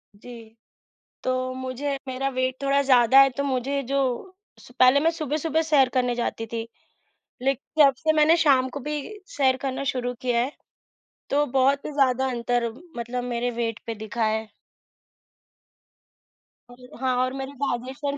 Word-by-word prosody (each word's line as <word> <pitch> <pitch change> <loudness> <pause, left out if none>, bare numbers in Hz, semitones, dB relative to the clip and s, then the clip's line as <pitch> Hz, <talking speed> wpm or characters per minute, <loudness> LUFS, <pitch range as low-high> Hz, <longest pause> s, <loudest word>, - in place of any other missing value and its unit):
जी। 225 +1 -12 0.7
तो 255 0 -1
मुझे 260 +2 -3
मेरा 260 +1 -2
वेट 255 0 -1
थोड़ा 275 0 +2
ज़्यादा 260 -1 +6
है 270 0 +6
तो 280 - -1
मुझे 275 +1 -1
जो 275 +2 -1 0.6
स - - -16
पहले 255 +2 +6
मैं 325 +3 +3
सुबह-सुबह 315 0 -1
सैर 295 -5 +4
करने 250 -1 +1
जाती 235 -1 -3
थी, 230 0 -5 0.7
लेकिन 275 +3 +1
जब 275 - +4
से 315 +2 +1
मैंने 310 +2 +5
शाम 270 -5 +3
को 285 - -6
भी 300 0 -1 0.4
सैर 260 -2 +3
करना 270 0 -3
शुरू 245 -1 -2
किया 245 -2 +1
है, 260 +4 -2 0.8
तो 290 +1 +3
बहुत 270 +2 +2
ही - - -5
ज़्यादा 265 -2 +2
अंतर 240 -1 -1 0.2
मतलब 240 +1 -4
मेरे 245 0 -2
वेट 230 -2 -2
पे 230 - -3
दिखा 220 +2 -3
है। 220 0 -1 2.2
अ, - - -13 0.3
हाँ, 260 -1 0
और 255 +1 0
मेरी 270 0 -5
डाइजेशन 270 +2 -3
260 Hz, 155 wpm, -24 LUFS, 245-280 Hz, 2.2 s, ज़्यादा